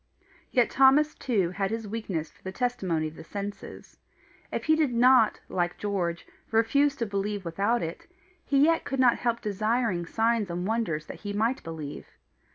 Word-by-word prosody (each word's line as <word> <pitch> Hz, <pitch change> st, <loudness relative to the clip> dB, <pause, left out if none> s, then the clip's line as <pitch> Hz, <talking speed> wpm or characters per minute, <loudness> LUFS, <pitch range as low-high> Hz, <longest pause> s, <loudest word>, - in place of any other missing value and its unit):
Yet 245 Hz, -2 st, +2 dB
Thomas 275 Hz, +3 st, +5 dB
too 200 Hz, -9 st, 0 dB
had 195 Hz, +1 st, -1 dB
his 225 Hz, -1 st, -4 dB
weakness 200 Hz, -7 st, -4 dB
for -, -, -27 dB
the 190 Hz, -, -6 dB
testimony 190 Hz, -9 st, -1 dB
of 155 Hz, -, -9 dB
the -, -, -10 dB
senses. 200 Hz, +4 st, -8 dB, 0.5 s
If -, -, -3 dB
he 315 Hz, -, +4 dB
did 310 Hz, -5 st, +1 dB
not, 245 Hz, -2 st, +5 dB
like 175 Hz, -1 st, -1 dB
George, 180 Hz, -5 st, -2 dB, 0.2 s
refuse 270 Hz, +6 st, +3 dB
to 235 Hz, -, -2 dB
believe 200 Hz, -1 st, -3 dB
without 200 Hz, +8 st, 0 dB
it, 165 Hz, +1 st, -6 dB, 0.4 s
he 280 Hz, -, 0 dB
yet 330 Hz, 0 st, +2 dB
could 270 Hz, -, -3 dB
not 250 Hz, -2 st, +4 dB
help 235 Hz, -1 st, 0 dB
desiring 215 Hz, -3 st, 0 dB
signs 225 Hz, -2 st, +1 dB
and 175 Hz, +1 st, -3 dB
wonders 205 Hz, -9 st, -1 dB
that -, -, -9 dB
he 205 Hz, -1 st, -5 dB
might 225 Hz, +5 st, 0 dB
believe. 155 Hz, -3 st, -7 dB
215 Hz, 170 wpm, -27 LUFS, 180-245 Hz, 0.5 s, Thomas